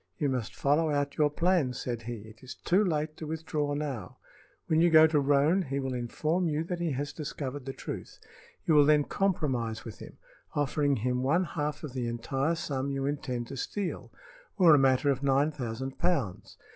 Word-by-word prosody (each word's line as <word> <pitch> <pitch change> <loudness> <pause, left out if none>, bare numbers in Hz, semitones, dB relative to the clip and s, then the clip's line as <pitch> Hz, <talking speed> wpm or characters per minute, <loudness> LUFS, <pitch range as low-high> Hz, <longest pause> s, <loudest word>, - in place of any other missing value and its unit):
"You 145 - 0
must 125 -4 -3
follow 150 +3 +2
out 145 -1 -1
your 150 -1 +4
plans," 165 -4 +1
said 120 -2 -3
he. 115 -1 -6
"It 110 +1 -14
is 130 -1 -9
too 190 +5 +2
late 155 -4 -1
to 155 - -6
withdraw 150 -2 -2
now. 135 -10 -4 0.5
When 160 0 +2
you 175 - +5
go 160 -1 +8
to 155 -2 +3
Roane 145 +6 +3
he 140 -5 -3
will 135 -1 -2
inform 155 +8 -1
you 155 0 0
that 175 +1 -4
he 170 -4 -1
has 145 +2 -3
discovered 145 -3 -5
the 135 - -3
truth. - - -7 0.5
You 160 - +3
will 145 -1 +7
then 150 -1 +5
compromise 130 - -1
with 115 - -9
him, - - -11 0.4
offering 145 0 +1
him 125 +2 -1
one 155 +8 +2
half 150 -3 -3
of 145 -5 -6
the 125 -2 -2
entire 135 +7 -1
sum 140 -4 -3
you 135 -1 -2
intend 135 -4 -2
to 135 - -6
steal, 195 +7 -4 0.5
or 175 -5 +7
a 145 - +6
matter 135 +1 +3
of 135 -1 -2
nine 140 +2 +2
thousand 130 -1 -5
pounds. 145 - -1
145 Hz, 195 wpm, -29 LUFS, 130-155 Hz, 0.5 s, go